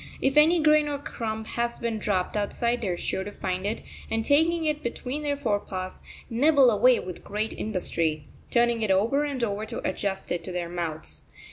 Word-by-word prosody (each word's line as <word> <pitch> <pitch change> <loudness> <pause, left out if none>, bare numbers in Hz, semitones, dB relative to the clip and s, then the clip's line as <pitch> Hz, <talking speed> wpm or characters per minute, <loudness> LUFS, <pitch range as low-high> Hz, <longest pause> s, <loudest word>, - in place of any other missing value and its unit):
If 270 +1 +1
any 320 +3 +6
grain 305 -1 +5
or 290 -1 -2
crumb 220 -5 -4
has 235 +1 -2
been 230 -2 -2
dropped 190 -3 -1
outside 235 +4 0
they 215 - -2
are 175 - -1
sure 190 - -2
to 205 - -6
find 185 -1 -3
it, 220 - -2 0.3
and, 225 0 -1
taking 325 +3 +3
it 300 -1 0
between 250 +3 -4
their 290 -1 -1
forepaws, 200 -6 -3 0.3
nibble 270 +1 +5
away 245 +4 +5
with 180 -1 -7
great 210 +2 -2
industry, 165 -7 -1 0.3
turning 235 -1 +2
it 215 - 0
over 225 +10 +3
and 275 -4 -3
over 205 -1 -1
to 230 - -4
adjust 195 -2 -2
it 175 - -1
to 185 - -5
their 175 -1 -3
mouths. 160 - -4
225 Hz, 195 wpm, -26 LUFS, 190-275 Hz, 0.3 s, any